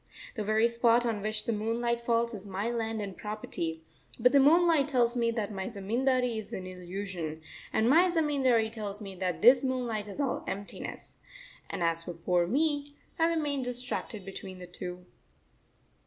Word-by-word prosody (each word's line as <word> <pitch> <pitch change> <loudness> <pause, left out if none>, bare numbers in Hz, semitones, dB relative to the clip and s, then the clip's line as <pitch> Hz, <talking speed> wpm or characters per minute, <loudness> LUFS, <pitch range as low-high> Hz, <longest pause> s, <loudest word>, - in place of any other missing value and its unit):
The 215 - -3
very 215 +2 +3
spot 235 0 +3
on 225 -3 -1
which 215 +1 -2
the 230 - 0
moonlight 235 +2 -1
falls 235 0 +1
is 205 -1 -7
my 200 +4 -2
landed 220 -4 -3
property, 170 -6 -4 0.4
but 250 +2 +5
the 280 - +6
moonlight 320 +1 +5
tells 245 -4 +2
me 235 -1 +2
that 220 -3 -2
my 190 -1 -3
zamindari 240 +3 0
is 215 - -8
an 185 - -4
illusion, 180 -3 -5 0.3
and 220 - +2
my 335 +8 +6
zamindari 270 -9 +2
tells 210 -3 -5
me 200 -3 -7
that 180 0 -2
this 250 +3 +8
moonlight 245 -5 -1
is 205 - -8
all 275 -3 -1
emptiness. 200 +1 -5 0.5
And - - -3
as 165 0 +1
for 175 - -5
poor 175 +1 +1
me, 290 - 0 0.2
I 325 - +5
remain 300 -4 0
distracted 245 -5 -4
between 195 -1 -8
the 180 - -8
two. 180 0 -7
225 Hz, 170 wpm, -30 LUFS, 195-250 Hz, 0.5 s, this